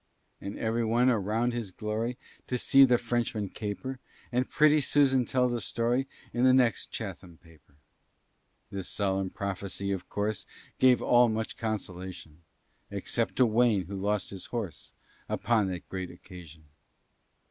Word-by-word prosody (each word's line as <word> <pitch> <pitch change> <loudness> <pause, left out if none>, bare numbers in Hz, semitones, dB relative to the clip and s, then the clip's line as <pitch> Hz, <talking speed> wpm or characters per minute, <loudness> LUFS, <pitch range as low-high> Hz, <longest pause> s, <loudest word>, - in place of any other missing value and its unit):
"And 100 +1 -6
every 115 +1 0
one 120 +3 +3
around 115 +2 0
shall 120 - -1 0.2
glory 110 +3 -2 0.3
To 125 - -1
see 135 +2 +6
the 125 -2 +4
Frenchman 115 -4 -1
caper; 115 +7 -5 0.3
And 125 +1 0
pretty 155 0 +4
Susan 135 -2 +3
tell 125 +1 +2
the 120 -1 -2
story 120 +3 0 0.3
In 120 - 0
the 130 0 +6
next 120 -6 +2
Chatham 85 -2 -7
paper." 80 -5 -22 1.0
This 95 -2 -4
solemn 95 -2 0
prophecy, 100 0 -3
of 95 -2 -4
course, 105 -2 -2 0.3
Gave 130 -1 +5
all 120 -1 +5
much 110 0 -2
consolation, 95 -7 -5 0.5
Except 100 0 -1
to 130 - +5
Wayne, 110 -4 +3
who 100 - -7
lost 100 +1 -1
his 95 -2 -7
horse 105 -10 -5 0.4
Upon 110 -4 +1
that 90 -2 -5
great 95 -1 -4
occasion. 85 -3 -12
110 Hz, 145 wpm, -29 LUFS, 95-120 Hz, 1.0 s, see